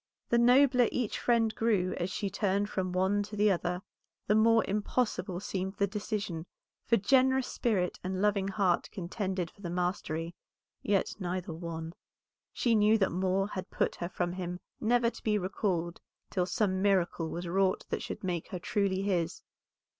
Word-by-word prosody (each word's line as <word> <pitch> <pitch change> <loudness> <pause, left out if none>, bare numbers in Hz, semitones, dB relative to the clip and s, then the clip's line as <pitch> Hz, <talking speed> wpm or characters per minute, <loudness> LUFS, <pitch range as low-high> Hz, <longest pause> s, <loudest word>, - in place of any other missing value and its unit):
The 235 - +4
nobler 250 0 +5
each 245 -4 -2
friend 230 -2 +2
grew 205 -5 +1
as 175 +1 -2
she 200 +2 -2
turned 205 0 0
from 185 -1 -1
one 190 +3 +2
to 205 +1 -6
the 210 0 +4
other, 180 0 -1 0.4
the 210 - +3
more 225 +1 +5
impossible 210 -2 -1
seemed 190 0 -3
the 200 - +2
decision, 200 -4 -4 0.4
for 230 - +4
generous 260 +4 +3
spirit 195 -9 -1
and 185 0 -2
loving 200 -1 +2
heart 190 -3 +1
contended 185 -2 -3
for 200 - -20
the 175 - -4
mastery, 175 -2 -2 0.5
yet 200 -2 +1
neither 180 -2 -3
won. 165 0 -6 0.6
She 235 - +1
knew 215 0 +5
that 195 -3 +1
Moor 190 +2 0
had 185 -2 -5
put - - 0
her 175 - -3
from 175 -1 -2
him 180 -1 -4 0.2
never 235 +1 +2
to - - -13
be 210 -1 +2
recalled 180 -3 -2 0.3
till 180 -2 0
some 190 0 0
miracle 180 -4 +1
was 175 +2 -5
wrought 190 +2 +1
that - - -2
should - - -6
make 175 -3 -2
her 185 - -5
truly 195 0 0
his. 180 -5 -1
195 Hz, 170 wpm, -30 LUFS, 180-210 Hz, 0.6 s, nobler